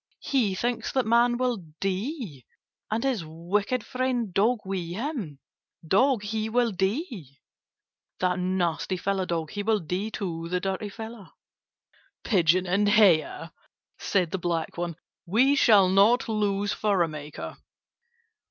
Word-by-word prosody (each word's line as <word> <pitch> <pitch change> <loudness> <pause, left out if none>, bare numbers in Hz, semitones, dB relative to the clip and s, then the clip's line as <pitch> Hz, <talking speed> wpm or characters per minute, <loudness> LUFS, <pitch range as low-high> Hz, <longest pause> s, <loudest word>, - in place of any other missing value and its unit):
He 230 -9 +1
thinks 240 +4 -2
that 260 -2 +1
Man 240 +2 +3
will 250 -2 0 0.2
die, 195 - -3 0.5
and 220 +2 -1
his 255 -9 0
wicked 190 +9 -2
friend 250 -5 -1
Dog 215 +4 +2
with 190 -3 -3
him. 210 - -4 0.5
Dog, 240 - +3
he 215 +1 -2
will 240 0 +2
die. 190 - -3 0.8
That 180 0 +1
nasty 180 -1 -1
fellow 190 0 -1
Dog. 165 -3 -2
He 205 - -3
will 215 +1 +1
die 185 +5 -3
too, 170 -6 -4
the 180 +1 0
dirty 195 +2 -3
fellow!" 220 -1 -9 0.9
"Pigeon 180 -2 +3
and 200 +3 +2
Hare!" 175 -6 +3 0.5
said 180 -5 0
the 190 - -2
black 170 -2 -2
one. 175 -1 -3 0.3
"We 245 +10 +4
shall 210 -8 +6
not 200 +6 +4
lose 205 -2 0
furrow 195 -5 +1
maker." 150 -1 -7
200 Hz, 135 wpm, -26 LUFS, 180-230 Hz, 0.9 s, shall